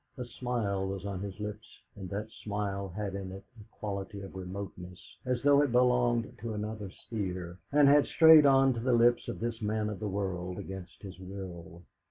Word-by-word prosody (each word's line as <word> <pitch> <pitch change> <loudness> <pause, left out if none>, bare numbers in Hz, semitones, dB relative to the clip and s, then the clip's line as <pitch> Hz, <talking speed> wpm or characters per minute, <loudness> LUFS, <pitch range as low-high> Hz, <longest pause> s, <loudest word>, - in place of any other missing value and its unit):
A 125 - -4
smile 115 -6 -2
was 95 0 -5
on 100 -2 -3
his 100 +1 -6
lips, 105 +1 -7 0.2
and 95 -3 -7
that 105 +2 -4
smile 100 -2 -4
had 100 +2 -4
in 95 -1 -5
it 95 +1 -9
a - - -11
quality 100 -1 -5
of 95 -1 -9
remoteness, 90 -1 -8
as 125 -1 0
though 145 0 +6
it 145 -4 +1
belonged 125 -2 +2
to 110 0 -4
another 105 -1 -4
sphere, 95 -4 -5
and 145 0 +6
had 145 +1 +6
strayed 160 -3 +8
on 135 -1 +5
to 120 - -4
the 125 +2 +1
lips 120 +1 +4
of - - -5
this 115 0 -3
man 105 0 -1
of 105 - -6
the 105 - -3
world 90 -2 -3
against 95 -1 -8
his 95 -2 -9
will. 90 -2 -9
105 Hz, 195 wpm, -30 LUFS, 95-120 Hz, 0.2 s, strayed